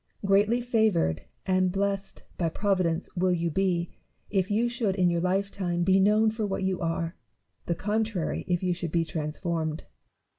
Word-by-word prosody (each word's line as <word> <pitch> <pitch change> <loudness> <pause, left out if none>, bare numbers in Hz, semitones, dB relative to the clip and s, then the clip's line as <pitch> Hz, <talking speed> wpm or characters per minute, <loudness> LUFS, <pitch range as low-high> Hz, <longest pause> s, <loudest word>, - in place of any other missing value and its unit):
Greatly 205 +4 +4
favoured 220 - +1 0.2
and 185 -1 +2
blessed 195 0 -2
by 170 -2 0
Providence 185 -2 0
will 185 +1 +2
you 170 -1 0
be, 175 -1 0 0.4
if 190 -1 +1
you 220 +3 +2
should 235 -5 -1
in 180 -2 +3
your 170 0 0
lifetime 185 -1 0
be 190 +2 +4
known 215 +3 +4
for 220 0 -3
what 195 0 -2
you 190 -1 0
are: 165 0 -2 0.5
the 170 - +1
contrary, 210 0 -1
if 180 0 0
you 180 -1 +2
should 170 -2 -4
be 165 0 +1
transformed. 160 0 -3
185 Hz, 160 wpm, -27 LUFS, 170-200 Hz, 0.5 s, Greatly